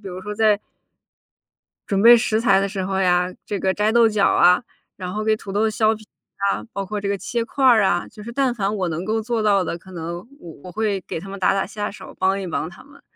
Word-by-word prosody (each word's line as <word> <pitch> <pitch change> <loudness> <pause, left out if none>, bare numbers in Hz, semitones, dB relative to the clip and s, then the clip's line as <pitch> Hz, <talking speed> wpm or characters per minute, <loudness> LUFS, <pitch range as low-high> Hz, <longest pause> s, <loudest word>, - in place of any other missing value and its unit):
比 195 - -7
如 180 +1 -7
说 210 +2 -6
在 215 -1 +3 1.3
准 195 -1 +1
备 240 +2 +9
食 225 -2 +1
材 195 -5 +4
的 200 - 0
时 190 -2 -3
候 190 0 -1
呀， 180 -1 +2
这 205 -2 -3
个 190 0 +1
摘 210 +1 +1
豆 235 -1 +5
角 210 -2 +2
啊， 180 +6 +4 0.3
然 180 -1 -6
后 215 +1 -2
给 220 0 +2
土 195 -2 -9
豆 215 +2 +1
削 215 +1 +2
皮 215 0 -14 0.5
啊， - - -3
包 195 -1 -4
括 210 +2 -4
这 200 0 -3
个 200 - 0
切 235 +4 -2
块 270 +3 -1
儿 235 -5 +6
啊。 175 -2 +1
就 210 - -12
是 235 - -7
但 260 -1 +1
凡 200 -1 -1
我 185 -3 -1
能 165 +3 -3
够 220 +1 0
做 230 0 -1
到 200 -3 +3
的， 170 - -4
可 185 +2 -16
能 170 0 -5 0.2
我 170 - -10
我 180 - -9
会 210 -2 -1
给 - - -4
他 195 - -10
们 200 - -7
打 185 - +3
打 195 - 0
下 205 0 -4
手， - - -12
帮 190 +1 +1
一 185 - -5
帮 160 0 -3
他 180 - -15
们。 280 0 -19
200 Hz, 280 characters per minute, -22 LUFS, 185-220 Hz, 1.3 s, 备